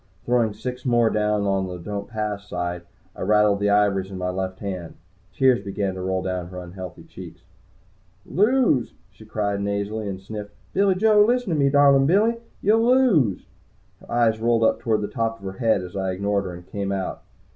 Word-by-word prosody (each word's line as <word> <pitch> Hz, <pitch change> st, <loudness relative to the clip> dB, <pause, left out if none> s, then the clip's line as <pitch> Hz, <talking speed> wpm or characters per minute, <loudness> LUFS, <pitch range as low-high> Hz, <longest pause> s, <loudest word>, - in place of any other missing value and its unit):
Throwing 120 Hz, -3 st, +1 dB
six 125 Hz, 0 st, -6 dB
more 120 Hz, -3 st, +3 dB
down 105 Hz, -1 st, +1 dB
on 95 Hz, -1 st, 0 dB
the 90 Hz, -1 st, -6 dB
"Don't 100 Hz, +3 st, -5 dB
Pass" 105 Hz, -3 st, -4 dB
side, 90 Hz, 0 st, -3 dB, 0.3 s
I -, -, -10 dB
rattled 105 Hz, 0 st, +3 dB
the 105 Hz, 0 st, +1 dB
ivories 100 Hz, -2 st, +2 dB
in 95 Hz, -, -7 dB
my 90 Hz, 0 st, -2 dB
left 95 Hz, 0 st, -4 dB
hand. 95 Hz, -5 st, -6 dB, 0.4 s
Tears 125 Hz, +2 st, +3 dB
began 100 Hz, -1 st, -2 dB
to 95 Hz, -, -6 dB
roll 95 Hz, 0 st, -1 dB
down 90 Hz, -2 st, -3 dB
her 90 Hz, +1 st, -10 dB
unhealthy 90 Hz, 0 st, -8 dB
cheeks. -, -, -12 dB, 0.8 s
"Lose!" 215 Hz, -, +2 dB, 0.2 s
she 105 Hz, +2 st, -16 dB
cried 100 Hz, -2 st, -2 dB
nasally, 100 Hz, +1 st, -2 dB
and 95 Hz, -1 st, -4 dB
sniffled. 105 Hz, +1 st, -8 dB, 0.2 s
"Billy 195 Hz, 0 st, +3 dB
Joe! 210 Hz, +1 st, +5 dB
Listen 245 Hz, 0 st, +1 dB
to 155 Hz, -, 0 dB
me, 140 Hz, -1 st, +4 dB
darlin' 140 Hz, -1 st, +5 dB
Billy! 215 Hz, +7 st, +3 dB, 0.3 s
You'll 220 Hz, +3 st, +4 dB
lose!" 230 Hz, -, +3 dB, 0.5 s
Her -, -, -15 dB
eyes 115 Hz, -2 st, +2 dB
rolled 115 Hz, 0 st, +2 dB
up 110 Hz, -, +3 dB
toward 110 Hz, -2 st, 0 dB
the 105 Hz, -, -2 dB
top 115 Hz, -2 st, -2 dB
of 100 Hz, -, -13 dB
her 95 Hz, 0 st, -7 dB
head 110 Hz, -5 st, +2 dB
as 90 Hz, +1 st, -9 dB
I 95 Hz, -1 st, -1 dB
ignored 100 Hz, +1 st, -1 dB
her 90 Hz, -, -5 dB
and 90 Hz, 0 st, -12 dB
came 100 Hz, +1 st, -4 dB
out. 95 Hz, -1 st, -3 dB
105 Hz, 195 wpm, -23 LUFS, 95-125 Hz, 0.8 s, Joe